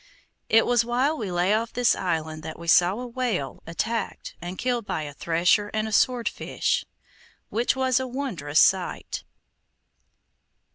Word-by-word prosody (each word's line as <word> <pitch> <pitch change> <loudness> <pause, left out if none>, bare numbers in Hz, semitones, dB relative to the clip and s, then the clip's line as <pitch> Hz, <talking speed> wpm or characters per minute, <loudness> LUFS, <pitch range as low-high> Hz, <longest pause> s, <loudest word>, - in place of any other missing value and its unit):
It 225 +1 +5
was 240 -2 +3
while 250 +6 +1
we 210 -10 -4
lay 175 +3 +2
off 225 +1 0
this 245 -1 +3
island 160 -3 -2
that 160 0 -7
we 170 - -10
saw 175 +2 +5
a 250 - -5
whale 235 - -3
attacked 220 +7 -3
and 175 +2 -6
killed 245 -2 -1
by 160 -6 -3
a 145 -1 -7
thresher 175 +7 +2
and 215 0 0
a - - -5
swordfish, 240 +2 +1 0.7
which 235 +4 +1
was 260 -1 +2
a 260 - -3
wondrous 205 - -1
sight. 190 -2 +1
215 Hz, 150 wpm, -25 LUFS, 170-245 Hz, 0.7 s, It